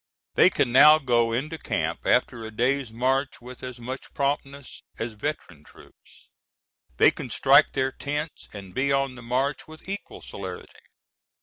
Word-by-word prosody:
They - - +6
can 120 - 0
now 150 +5 +8
go 120 -5 +1
into 155 +7 -3
camp - - -3
after 115 - +1
a 110 - -6
day's 125 +3 0
march 130 +4 -1
with 125 0 -12
as 125 -1 -8
much 130 +3 -8
promptness 140 -1 -3 0.2
as 115 0 -4
veteran 105 - -5
troops; - - -20 0.7
they - - +6
can - - -8
strike - - +4
their 130 0 0
tents 150 +3 -5
and 95 -3 -10
be 140 +5 0
on 135 -1 +1
the 125 - -11
march 130 +4 -2
with 155 +2 -14
equal 200 +1 -7
celerity. 95 -2 -8
130 Hz, 160 wpm, -25 LUFS, 115-140 Hz, 0.7 s, now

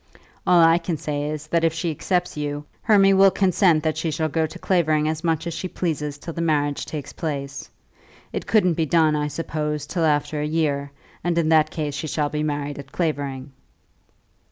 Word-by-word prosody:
All 180 -1 +6
I 165 +1 +5
can 165 -1 -3
say 145 0 -3
is, 155 0 -5
that 170 0 +1
if 165 -1 +3
she 170 0 -1
accepts 180 +3 -1
you, 145 0 -4 0.2
Hermy 195 -3 +5
will 195 0 +7
consent 185 -4 +3
that 155 -1 0
she 160 - -1
shall 155 +1 -1
go 160 +1 0
to - - -10
Clavering 155 -5 +1
as 155 +1 -2
much 165 -2 0
as 170 - -3
she 170 +3 -4
pleases 150 -5 -3
till 165 +3 -7
the 170 - -4
marriage 145 -3 0
takes 150 -3 -6
place. 140 -3 -5 0.6
It - - -4
couldn't 185 -6 +3
be 160 -1 -1
done, 160 -1 +3
I 150 0 0
suppose, 150 -1 -3
till 165 +3 -2
after 150 0 +1
a 150 - -1
year; 145 -3 0 0.3
and 175 -1 0
in 160 -2 +2
that 155 -1 +4
case 150 -3 -3
she 150 +2 -4
shall 150 -1 -1
be 150 0 -2
married 145 -1 -3
at 140 -1 -10
Clavering." 140 -5 -2
155 Hz, 205 wpm, -23 LUFS, 145-170 Hz, 0.6 s, will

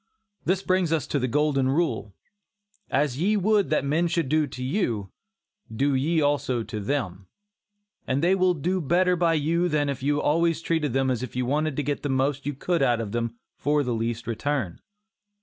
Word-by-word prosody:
This 190 +2 +1
brings 185 -3 +1
us 160 -3 +1
to 145 - -1
the 130 - 0
golden 140 0 +1
rule, 135 - -1 0.7
"As 140 -2 0
ye 210 +4 +3
would 205 -3 +2
that 150 -2 +1
men 160 +5 +1
should 165 -4 -1
do 155 0 +2
to 125 -1 -7
you, 120 - -1 0.6
do 135 +5 +1
ye 155 +5 +1
also 140 -5 +1
to 110 -1 -5
them," 100 -5 -3 0.8
and 135 +4 0
they 180 +2 +4
will 185 -1 +3
do 180 +5 -1
better 180 +4 +2
by 170 -1 +2
you 165 +4 +1
than 150 -2 +1
if 140 -1 -4
you 145 +2 +1
always 165 +2 +2
treated 160 -5 -1
them 135 0 +2
as 125 -2 -1
if 130 -3 -6
you 125 0 0
wanted 150 +3 0
to 150 - -1
get 145 +1 -2
the 145 - -3
most 135 +1 0
you 145 - -2
could 170 +3 -1
out 120 -3 +3
of 110 -3 -4
them 115 0 -2 0.2
for 145 0 +1
the 125 -2 -1
least 115 +1 -2
return. 120 -4 -2
145 Hz, 200 wpm, -25 LUFS, 125-165 Hz, 0.8 s, they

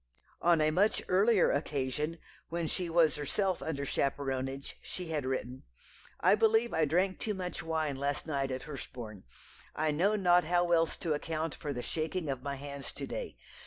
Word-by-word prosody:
On 170 -2 +4
a 155 0 +4
much 200 +7 +3
earlier 200 +1 +4
occasion, 145 +2 -1 0.3
when 170 0 -1
she 175 +2 -2
was 165 -3 +4
herself 185 +6 0
under 140 -3 -2
chaperonage, 135 -1 -2
she 180 -3 -6
had 150 -5 -1
written: 130 -1 -3 0.6
"I - - +5
believe 225 +2 +3
I 160 -1 +3
drank 185 +5 +1
too 210 -2 -2
much 180 -2 -4
wine 155 -3 -1
last 140 +1 -1
night 140 -4 -1
at 130 0 -3
Hurstbourne. 120 - -8 0.5
I 155 0 +1
know 185 +8 +2
not 180 -3 +5
how 175 +1 +2
else 165 -1 +3
to 165 -3 -1
account 160 +1 -2
for 145 - -5
the 125 -3 -4
shaking 160 0 -2
of 135 -2 -2
my 140 +1 -3
hands 140 0 -7
to - - -5
day. - - -5
155 Hz, 175 wpm, -32 LUFS, 140-175 Hz, 0.6 s, I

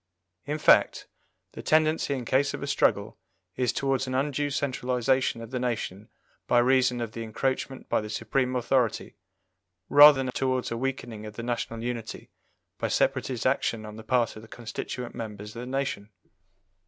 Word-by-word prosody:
In 150 +1 -1
fact, - - +4 0.5
the - - -8
tendency 155 -2 +2
in 125 -3 -5
case 140 +4 +1
of - - -7
a - - -2
struggle - - +1 0.4
is 125 -2 +1
towards 135 -1 -1
an 130 - -3
undue 145 +1 0
centralization 130 -3 0
of 115 - -10
the 130 - -2
nation 110 -4 -3 0.4
by 120 - +3
reason 125 0 +3
of 115 -2 -4
the 115 - -7
encroachment 130 +4 -3
by - - +1
the 105 - -7
Supreme 125 +4 -1
authority, 125 -2 0 0.8
rather 145 -2 +8
than 130 - -3
towards 130 -2 -1
a - - -1
weakening 115 -4 -4
of 105 - -10
the 115 - -6
national 115 -1 -3
unity 120 -2 -5 0.5
by - - 0
separatist 125 -4 0
action 115 -4 0
on 105 0 -9
the 110 - -10
part 120 +1 +1
of 110 - -9
the 110 - -13
constituent 120 +2 -6
members 105 -1 -7
of - - -6
the 125 - -6
nation. 130 -6 -3
125 Hz, 170 wpm, -27 LUFS, 115-135 Hz, 0.8 s, rather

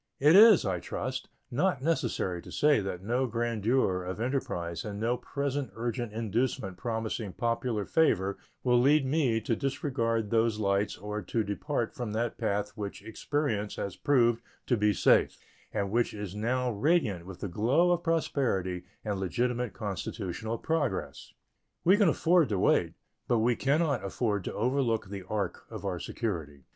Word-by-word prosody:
It 150 +5 +6
is, 215 - +8
I 95 -3 0
trust, 130 +7 -4 0.2
not 140 +1 +1
necessary 120 - 0
to - - -12
say 150 -3 +4
that 95 -2 -4
no 125 +5 0
grandeur 115 -4 0
of 90 +3 -5
enterprise 85 - -2
and 100 -1 -5
no 115 +3 +1
present 140 +1 -3
urgent 120 0 -3
inducement 110 -2 -1
promising 110 -2 -3
popular 115 -2 -1
favor 100 - +2 0.2
will 125 -1 +4
lead 145 +2 +4
me 130 -5 +2
to 115 - 0
disregard 115 -6 -1
those 115 -1 +2
lights 100 -1 0
or 105 +2 -4
to 110 +4 -1
depart 110 +4 -2
from 120 -4 -4
that 115 +1 -2
path 105 -2 -1
which 100 -2 -6
experience 115 -3 -2
has 100 -2 -4
proved 120 -4 +3 0.2
to 125 - +2
be 105 -1 +3
safe, - - +3 0.3
and 100 -2 -2
which 120 0 +1
is 105 -3 -5
now 125 +4 0
radiant 110 - +1
with 95 -2 -9
the - - -3
glow 130 - +2
of 175 -1 +1
prosperity 115 - 0 0.2
and 100 -2 -2
legitimate 120 +4 -1
constitutional 105 +2 -4
progress. 155 -1 -2 0.5
We 185 +4 +6
can 205 -4 +4
afford 165 -1 +3
to 100 - 0
wait, - - +2 0.3
but 120 - +3
we 115 +2 +2
can 140 +6 +2
not 140 - 0
afford 100 0 -1
to - - -3
overlook 115 -3 0
the 100 -2 -6
ark 100 -4 -3
of - - -7
our 90 -3 -2
security. 80 - -4
115 Hz, 160 wpm, -29 LUFS, 100-130 Hz, 0.5 s, is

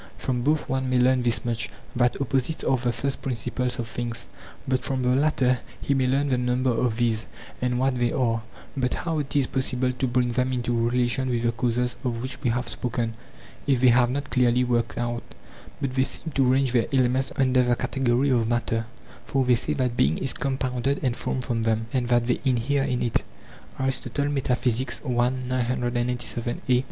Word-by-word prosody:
From 125 -2 -1
both 150 +4 +1
one 130 0 -1
may 130 - +2
learn 130 +1 +4
this 120 -1 0
much, 115 -1 -1 0.3
that 120 0 +2
opposites 135 +3 0
are 135 - +3
the 125 -1 0
first 135 +2 -2
principles 125 0 -1
of 115 - -3
things; 115 +1 -4 0.4
but 130 -1 +1
from 130 -2 -1
the 125 - +2
latter 130 -3 +2 0.2
he 140 - 0
may 130 -2 +2
learn 140 +2 +1
the 130 -2 +1
number 125 +1 +1
of 115 -1 0
these, 115 -2 +1 0.3
and 125 0 0
what 130 0 +1
they 120 -1 +2
are. 115 -3 +1 0.3
But 125 -2 0
how 165 -2 -2
it 145 -1 -4
is 140 -2 +4
possible 130 -1 0
to 130 +1 -2
bring 125 0 +1
them 125 +2 0
into 120 -1 0
relation 125 +1 +1
with 120 -1 0
the 120 - +2
causes 125 +1 -1
of 120 -3 -1
which 130 +2 -5
we 125 - +1
have 125 +2 -1
spoken 115 -2 -1 0.5
if 135 -3 +3
they 130 0 +6
have 120 0 +4
not 140 +3 -3
clearly 125 -1 +3
worked 120 -2 0
out; 120 0 -2 0.6
but 135 -2 -2
they 130 0 +3
seem 160 +4 -4
to 135 - +3
range 135 -1 +2
their 120 -2 +2
elements 130 0 +2
under 130 -1 +3
the 125 -1 +2
category 130 +1 +1
of 115 -3 +2
matter, 115 -1 -1 0.4
for 135 -1 0
they 125 - +4
say 120 - +1
that 125 -3 -1
being 70 +4 +3
is 135 - -1
compounded 130 0 -1
and 125 -3 +1
formed 130 - -2
from 115 -1 -1
them, 110 0 +1
and 125 -2 0
that 120 -1 +3
they 125 - 0
inhere 135 +1 +1
in 130 -2 0
it. 120 - 0
125 Hz, 185 wpm, -25 LUFS, 120-130 Hz, 0.6 s, they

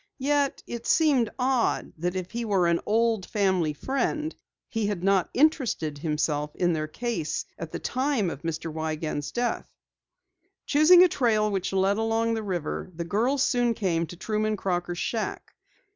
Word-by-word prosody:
Yet, 285 0 0
it 235 -1 -6
seemed 280 -8 +3
odd 255 -2 0
that 175 +3 -2
if 185 -1 -4
he 235 0 -3
were 200 -5 +2
an 170 0 +2
old 225 -1 +2
family 190 -7 +1
friend 275 - -2 0.3
he 225 -3 -1
had 200 -4 -3
not 195 -2 +2
interested 245 - +1
himself 150 -1 -1
in 175 -1 +1
their 155 -1 -2
case 170 -4 -3
at 165 - -6
the - - -3
time 255 - 0
of 140 - -8
Mr. 165 -1 -4
Wiegand's 155 -2 -3
death. 240 0 -2 1.0
Choosing 320 +5 +7
a - - +7
trail 220 -9 +1
which 190 -2 -2
led 195 +1 +2
along 225 +1 +1
the 225 - -1
river, 185 -3 -3
the 170 0 -4
girls 245 +9 +1
soon 240 -2 +2
came 170 -5 0
to 175 - -9
Truman 215 +3 -1
Crocker's 175 -2 -2
shack. 220 +4 -3
205 Hz, 160 wpm, -26 LUFS, 170-240 Hz, 1.0 s, Choosing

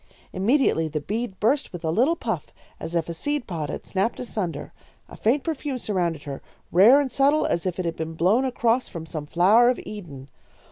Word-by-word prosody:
"Immediately 195 - +2
the 155 0 -3
bead 210 +5 -4
burst 265 +7 +1
with 175 -2 -7
a 160 - +1
little 255 - +3
puff, - - -4 0.3
as 170 - -5
if 165 -2 0
a 170 - -4
seed 290 - -1
pod 160 -5 -4
had - - -6
snapped 195 +4 -1
asunder. 210 -8 -4 0.3
A - - -12
faint 255 +6 +1
perfume 295 -4 -3
surrounded 175 - -2
her, 140 -2 -6 0.3
rare 215 +11 +7
and 275 -3 -1
subtle 280 +4 +3
as 170 +2 -1
if 180 - -3
it 185 - -2
had 165 -1 -3
been 160 0 -4
blown 190 +10 +3
across 245 -1 +1
from 165 -4 -7
some 155 -2 -6
flower 205 +10 +5
of 250 - 0
Eden. 150 -11 -9
195 Hz, 200 wpm, -24 LUFS, 165-250 Hz, 0.3 s, rare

